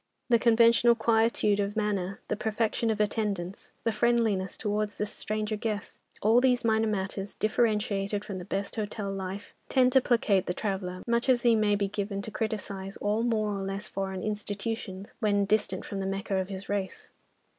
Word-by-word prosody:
The 235 Hz, -1 st, +5 dB
conventional 235 Hz, 0 st, +5 dB
quietude 225 Hz, -2 st, +2 dB
of 200 Hz, +1 st, -1 dB
manner, 200 Hz, -3 st, -1 dB
the -, -, 0 dB
perfection 220 Hz, +1 st, 0 dB
of 215 Hz, -1 st, 0 dB
attendance, 205 Hz, -4 st, -2 dB
the 230 Hz, -, +2 dB
friendliness 220 Hz, -4 st, +1 dB
towards 210 Hz, -1 st, -1 dB
the 210 Hz, -, 0 dB
stranger 215 Hz, +1 st, -3 dB
guest, 215 Hz, -1 st, -4 dB, 0.2 s
all 225 Hz, +4 st, +5 dB
these 250 Hz, -2 st, +3 dB
minor 220 Hz, 0 st, +3 dB
matters, 195 Hz, -1 st, -3 dB
differentiated 210 Hz, -2 st, 0 dB
from 195 Hz, -2 st, -5 dB
the 180 Hz, -, -7 dB
best 200 Hz, +3 st, -3 dB
hotel 210 Hz, -1 st, -3 dB
life, 195 Hz, +1 st, -5 dB, 0.2 s
tend 255 Hz, -1 st, +4 dB
to 265 Hz, -, +6 dB
placate 210 Hz, -6 st, +2 dB
the 180 Hz, -, -1 dB
traveller, 190 Hz, -3 st, -3 dB
much 235 Hz, +2 st, +1 dB
as 245 Hz, -2 st, +4 dB
he 235 Hz, -2 st, +5 dB
may 210 Hz, -1 st, +3 dB
be 200 Hz, -1 st, 0 dB
given 200 Hz, 0 st, -3 dB
to 220 Hz, -, -6 dB
criticise 200 Hz, -3 st, -4 dB
all 210 Hz, +2 st, 0 dB
more 215 Hz, -3 st, 0 dB
or 195 Hz, -, -3 dB
less 195 Hz, +1 st, -4 dB
foreign 190 Hz, -1 st, -4 dB
institutions, 210 Hz, -1 st, -4 dB
when 205 Hz, -3 st, +2 dB
distant 195 Hz, -2 st, 0 dB
from 200 Hz, -, -4 dB
the 190 Hz, -, -2 dB
"Mecca" 195 Hz, 0 st, -2 dB
of 190 Hz, 0 st, -1 dB
his 195 Hz, 0 st, -6 dB
race. 200 Hz, -2 st, -3 dB
210 Hz, 175 wpm, -28 LUFS, 195-225 Hz, 0.2 s, to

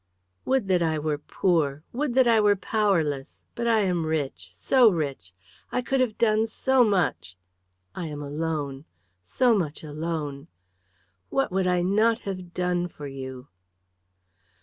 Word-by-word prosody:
"Would 260 Hz, -6 st, +1 dB
that 180 Hz, -2 st, +3 dB
I 160 Hz, -2 st, +1 dB
were 150 Hz, -1 st, -2 dB
poor! 155 Hz, -3 st, 0 dB
Would 260 Hz, 0 st, -2 dB
that 260 Hz, -2 st, +5 dB
I 225 Hz, -2 st, +5 dB
were 205 Hz, -1 st, +4 dB
powerless! 170 Hz, -10 st, 0 dB
But 235 Hz, 0 st, -3 dB
I 225 Hz, -2 st, +4 dB
am 180 Hz, -4 st, 0 dB
rich 155 Hz, -4 st, -3 dB
so 255 Hz, -4 st, +4 dB
rich. 140 Hz, -, -3 dB, 0.4 s
I 250 Hz, -, -1 dB
could 270 Hz, +3 st, 0 dB
have 245 Hz, -5 st, 0 dB
done 220 Hz, -1 st, +2 dB
so 260 Hz, +3 st, +3 dB
much. 185 Hz, -, 0 dB, 0.6 s
I 170 Hz, -, -5 dB
am 150 Hz, -1 st, -6 dB
alone 145 Hz, -1 st, -3 dB, 0.4 s
so 240 Hz, -, +2 dB
much 160 Hz, -7 st, -2 dB
alone. 150 Hz, -2 st, -4 dB, 0.8 s
What 270 Hz, -, 0 dB
would 190 Hz, 0 st, +1 dB
I 180 Hz, -1 st, +2 dB
not 215 Hz, +5 st, +3 dB
have 185 Hz, -3 st, -5 dB
done 180 Hz, -1 st, 0 dB
for 150 Hz, -4 st, -10 dB
you?" 130 Hz, -1 st, -8 dB
175 Hz, 150 wpm, -26 LUFS, 150-220 Hz, 0.8 s, that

